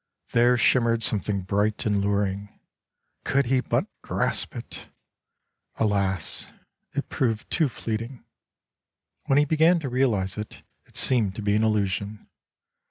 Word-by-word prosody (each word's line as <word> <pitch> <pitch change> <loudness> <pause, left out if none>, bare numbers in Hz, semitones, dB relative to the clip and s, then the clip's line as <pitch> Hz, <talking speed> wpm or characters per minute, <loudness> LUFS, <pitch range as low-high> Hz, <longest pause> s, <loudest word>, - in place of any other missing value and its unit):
There 120 +1 +4
shim 125 +2 +4
mered 115 -1 +1
something 105 -2 0
bright 105 +3 0
and 105 -2 +1
luring. 100 0 -1 0.7
Could 140 0 +2
he 130 +2 +2
but - - 0 0.2
grasp - - -1
it!. - - -8 0.9
Alas, 100 -5 0 0.5
it - - -2
proved 115 -4 -1
too 160 -5 +3
fleeting. 115 +2 -5 1.0
When 135 - +3
he 145 - +5
began 160 +4 +4
to 135 - -3
realize 110 -7 0
it,, 105 - -8 0.2
it - - -23
seemed 110 -7 +1
to 110 - -5
be 100 0 +2
an 110 - +2
illusion. 105 -1 -1
110 Hz, 135 wpm, -25 LUFS, 100-125 Hz, 1.0 s, he